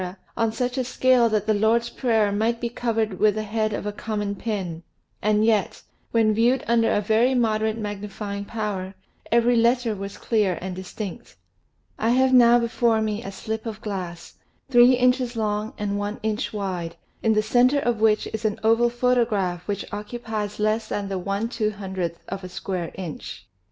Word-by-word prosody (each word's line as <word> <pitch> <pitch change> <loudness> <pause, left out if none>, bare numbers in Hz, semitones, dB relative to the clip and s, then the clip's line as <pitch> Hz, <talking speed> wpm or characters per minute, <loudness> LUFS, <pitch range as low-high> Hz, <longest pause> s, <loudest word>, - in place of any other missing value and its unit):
on 225 -1 +1
such 250 +3 -2
a - - +1
scale 255 -1 +3
that 215 -2 0
the 215 - +2
Lord's 230 +3 +2
Prayer 220 -5 +1
might 225 +3 0
be 235 - -2
covered 225 -5 -1
with 210 -1 +4
the 215 - -2
head 215 +1 -1
of 205 - -4
a 210 - -1
common 205 -1 -3
pin, 190 -7 -4 0.4
and 215 +1 +2
yet, 215 -4 +1 0.3
when 220 -2 +3
viewed 235 +4 +2
under 230 -1 +3
a 205 - +2
very 225 +5 +2
moderate 220 -2 +1
magnifying 205 -1 -5
power, 200 -3 -4 0.4
every 235 +1 +4
letter 235 -1 +2
was 195 0 -7
clear 210 -6 +1
aftd 185 +1 -5
distinct. 190 +4 -7 0.6
I 225 - +1
have 260 +2 +3
now 240 -1 +7
before 235 -1 +1
me 215 0 -1
a 195 - -6
slip 220 +4 -5
of 220 -1 -5
glass, 180 -5 -6 0.3
three 245 0 +7
inches 250 0 +2
long 215 -1 -1
and 205 -1 -2
one 205 +1 -3
inch 215 -1 -1
wide, 185 -5 -4 0.3
in 225 - +3
the 215 0 +2
center 245 +5 +4
of 240 -5 0
which 215 -1 +3
is 220 0 -4
an 215 -1 -1
oval 230 +2 +4
photograph 230 -8 0
which 205 -1 -2
occupies 210 -1 -4
less 215 +1 +1
than 200 -1 -3
the 190 -1 -2
i - - -8 0.2
2OOth 195 -6 -2
of 195 0 -5
a 185 - -6
square 180 -1 -4
inch. 175 -5 -7
215 Hz, 175 wpm, -24 LUFS, 205-235 Hz, 0.6 s, now